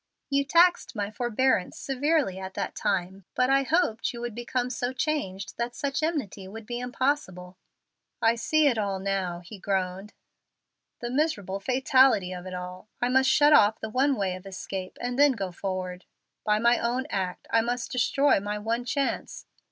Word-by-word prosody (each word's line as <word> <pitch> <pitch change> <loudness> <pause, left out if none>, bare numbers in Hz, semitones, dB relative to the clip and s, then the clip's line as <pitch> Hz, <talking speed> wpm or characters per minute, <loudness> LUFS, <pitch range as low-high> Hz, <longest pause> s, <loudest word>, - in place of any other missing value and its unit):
You 280 0 +3
taxed 345 0 +4
my 205 -1 -2
forbearance 240 -3 0
severely 275 - 0
at 190 0 -7
that - - -3
time. 185 +1 -2
But 255 +1 +2
I 275 0 +5
hoped 270 -6 +1
you 235 - -8
would 240 -2 -4
become 245 +2 -2
so 250 +1 -2
changed 245 - -3
that 235 0 -3
such 280 0 -2
enmity 275 - -2
would 220 +3 -9
be 240 +2 -4
impossible." 245 -8 -2 0.6
"I 225 0 +4
see 310 +6 +2
it 250 -6 +3
all 200 -2 -1
now," 190 -3 -2
he 190 +4 -11
groaned 190 +1 -2 0.9
"the 240 0 -3
miserable 210 - -1
fatality 255 -4 +3
of 180 0 -7
it 185 - -5
all. 180 +2 -7
I 245 - +1
must 265 +1 +4
shut 295 +2 +5
off 215 -5 +5
the 220 - -5
one 270 +5 +2
way 190 -5 -1
of 185 +1 -10
escape, 190 -1 -6
and 245 +2 -3
then 290 -1 +6
go 195 -5 -4
forward. 185 0 -4 0.4
By 210 0 +2
my 235 +2 +3
own 245 +3 -1
act, 185 -2 -3
I 225 - +4
must 240 +1 -3
destroy 275 +1 +3
my 205 +1 -3
one 225 +3 -2
chance. 275 +2 -2
230 Hz, 175 wpm, -27 LUFS, 190-265 Hz, 0.9 s, then